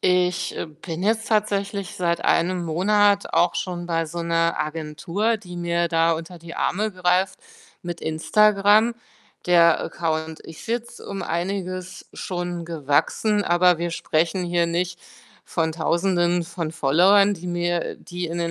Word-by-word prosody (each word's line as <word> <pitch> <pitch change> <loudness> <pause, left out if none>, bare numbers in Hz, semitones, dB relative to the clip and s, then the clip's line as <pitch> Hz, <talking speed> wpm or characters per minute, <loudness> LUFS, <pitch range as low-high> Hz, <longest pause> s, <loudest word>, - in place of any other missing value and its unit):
Ich, 180 -1 +1
äh, - - -3
bin 160 +3 -7
jetzt 225 +2 +1
tatsächlich 200 -2 -1
seit 170 -1 -1
1 175 +1 +2
Monat 200 +5 +2
auch 175 0 +3
schon 175 -2 -3
bei 165 -1 0
so 170 +2 -5
'ner 165 0 +1
Agentur, 165 +8 -1
die 180 -4 -10
mir 170 0 0
da 165 0 +3
unter 165 +2 -5
die 170 +1 -10
Arme 215 +3 0
greift 185 +1 +1 0.4
mit 175 -1 -6
Instagram. 210 +7 +3 0.5
Der 170 -2 +5
Account 160 -1 -3
ist 160 +6 -11
jetzt 235 +1 -4
um 195 -1 -6
einiges 185 +1 -4
schon 175 -1 -4
gewachsen, 165 +7 0
aber 175 0 +4
wir 170 0 -2
sprechen 165 +3 0
hier 175 -1 +1
nicht 175 +1 -2 0.5
von 160 -2 -1
Tausenden 175 +1 +1
von 165 -2 -5
Followern, 190 +8 +4
die 180 0 -9
mir 175 -1 -1
die 175 0 -6
in 170 +1 -4
den 170 -1 -1
175 Hz, 145 wpm, -23 LUFS, 165-195 Hz, 0.5 s, Der